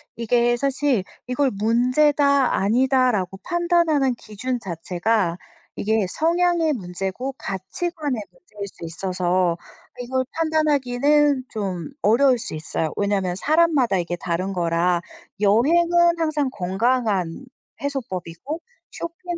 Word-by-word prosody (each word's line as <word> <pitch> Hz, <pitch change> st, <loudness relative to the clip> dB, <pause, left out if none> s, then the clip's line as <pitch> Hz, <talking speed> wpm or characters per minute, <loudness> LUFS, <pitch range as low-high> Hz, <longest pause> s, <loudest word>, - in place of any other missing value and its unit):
이게 240 Hz, +1 st, +2 dB
사실 275 Hz, -4 st, +1 dB, 0.2 s
이걸 255 Hz, +2 st, +1 dB
문제다, 260 Hz, +6 st, +3 dB
아니다 255 Hz, +5 st, +3 dB
라고 195 Hz, -2 st, -2 dB
판단하는 340 Hz, -6 st, +2 dB
기준 240 Hz, +3 st, -4 dB
자체가 180 Hz, 0 st, -1 dB, 0.4 s
이게 220 Hz, -1 st, +1 dB
성향의 335 Hz, -, +2 dB
문제고 195 Hz, +5 st, -4 dB
가치관의 275 Hz, -, -3 dB
문제일 210 Hz, -, -9 dB
수 185 Hz, -, -13 dB
있어서 180 Hz, 0 st, 0 dB, 0.4 s
이걸 260 Hz, +1 st, -1 dB
판단하기는 295 Hz, -3 st, +2 dB
좀 190 Hz, -3 st, -4 dB
어려울 245 Hz, +4 st, +4 dB
수 185 Hz, -, -4 dB
있어요. 155 Hz, 0 st, -2 dB
왜냐하면 200 Hz, -3 st, 0 dB
사람마다 295 Hz, -, +2 dB
이게 175 Hz, 0 st, -2 dB
다른 180 Hz, +2 st, -3 dB
거라 170 Hz, 0 st, +1 dB, 0.4 s
"여행은 340 Hz, +11 st, +4 dB
항상 305 Hz, -4 st, 0 dB
건강한 205 Hz, 0 st, 0 dB, 0.4 s
해소법이고, 255 Hz, -, -4 dB, 0.3 s
쇼핑은 335 Hz, +1 st, -6 dB
245 Hz, 270 characters per minute, -22 LUFS, 190-290 Hz, 0.4 s, 어려울